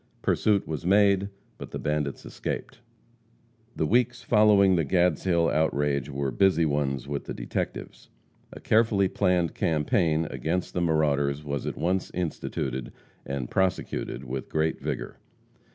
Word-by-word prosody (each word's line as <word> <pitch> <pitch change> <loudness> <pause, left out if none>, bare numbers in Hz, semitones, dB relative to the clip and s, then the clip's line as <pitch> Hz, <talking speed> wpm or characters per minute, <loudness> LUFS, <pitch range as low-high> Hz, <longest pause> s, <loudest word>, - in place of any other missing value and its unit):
Pursuit 105 -3 +2
was 80 -2 -4
made, 100 +1 +3 0.3
but - - -7
the - - -5
bandits 75 -2 -2
escaped. - - -5 1.0
The 80 - 0
weeks 120 +5 +1
following 105 -4 +5
the 85 - +2
Gadshill 85 +1 +2
outrage 75 -3 0
were 70 -1 -2
busy 85 +4 +3
ones 70 -3 -1
with 70 -1 -4
the - - -5
detectives. - - -5 0.4
A - - -10
carefully 110 -3 +3
planned 90 -3 +1
campaign 80 -1 +1
against 85 +3 -2
the 90 - -1
marauders 75 -3 +1
was 70 -2 -3
at - - -4
once 90 +2 0
instituted 65 -7 -3 0.4
and 70 -3 -4
prosecuted 95 -8 -1
with 65 +1 -5
great 80 +1 0
vigor. - - -4
80 Hz, 135 wpm, -26 LUFS, 70-95 Hz, 1.0 s, following